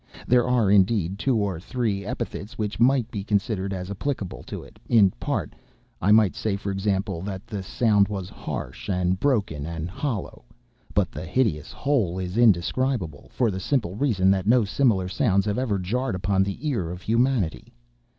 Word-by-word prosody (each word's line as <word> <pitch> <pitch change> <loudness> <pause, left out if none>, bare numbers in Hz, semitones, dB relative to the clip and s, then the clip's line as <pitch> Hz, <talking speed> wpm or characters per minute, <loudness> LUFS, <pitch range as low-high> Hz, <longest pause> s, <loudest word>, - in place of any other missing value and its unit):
There 125 0 +3
are, 120 -6 +3
indeed, 100 -2 +3
two 130 +1 +1
or 100 -5 -1
three 105 0 -2
epithets 115 -3 -5
which 105 -1 -3
might 125 -1 +3
be 100 -3 -4
considered 100 -1 -1
as 95 0 -4
applicable 100 -2 -3
to - - -6
it - - -16
in 105 -5 +6
part; - - -2 0.5
I 95 - +3
might 105 -3 +5
say, 110 -3 -1
for 100 0 -4
example, 95 -2 -1
that 95 0 -5
the 100 -2 -5
sound 105 +1 +2
was 95 -3 -4
harsh, - - -6
and 90 -1 +1
broken 100 - 0
and 85 +1 -5
hollow; 115 - -4 0.5
but - - +2
the - - -7
hideous 85 - 0
whole 120 -12 0
is 90 0 -4
indescribable, 110 - +1
for 120 -4 +1
the 95 - -4
simple 100 -3 -1
reason 100 -7 +2
that 95 0 0
no 120 -1 +5
similar 105 -4 +2
sounds 100 -1 +1
have 105 +2 0
ever 115 -6 0
jarred 120 +6 -1
upon 95 +1 +1
the 100 +10 -2
ear 95 - -1
of 90 +1 -7
humanity. 115 -5 0
100 Hz, 175 wpm, -25 LUFS, 95-120 Hz, 0.5 s, in